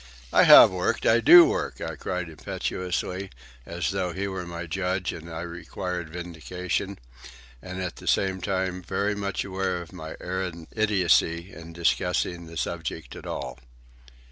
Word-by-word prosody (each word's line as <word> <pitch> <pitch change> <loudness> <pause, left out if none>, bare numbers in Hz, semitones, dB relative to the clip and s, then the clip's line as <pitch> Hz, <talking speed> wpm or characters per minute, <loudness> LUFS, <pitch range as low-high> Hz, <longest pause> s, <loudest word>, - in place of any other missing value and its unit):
"I - - +6
have - - +10
worked, 90 -1 -1
I 115 - +5
do 170 +9 +10
work," - - -2
I - - -4
cried 90 -1 -3
impetuously, 90 +3 -3 0.4
as 85 +2 -2
though 95 -3 -2
he 100 +3 -2
were 95 -2 -5
my 85 0 -6
judge 90 +2 -2
and 85 0 -9
I 80 0 -5
required 90 0 -5
vindication, 90 +3 -4 0.6
and 95 0 -7
at 90 -3 -4
the - - -11
same 95 -1 +1
time 95 -1 -1
very 100 +4 -1
much 100 -1 -3
aware 95 -2 -2
of 85 -2 -10
my 80 0 -7
arrant 90 -3 -4
idiocy 95 -4 +2
in 85 0 -10
discussing 85 0 0
the 85 0 -9
subject 80 -1 -4
at - - -9
all. 65 0 -5
90 Hz, 155 wpm, -26 LUFS, 85-95 Hz, 0.6 s, have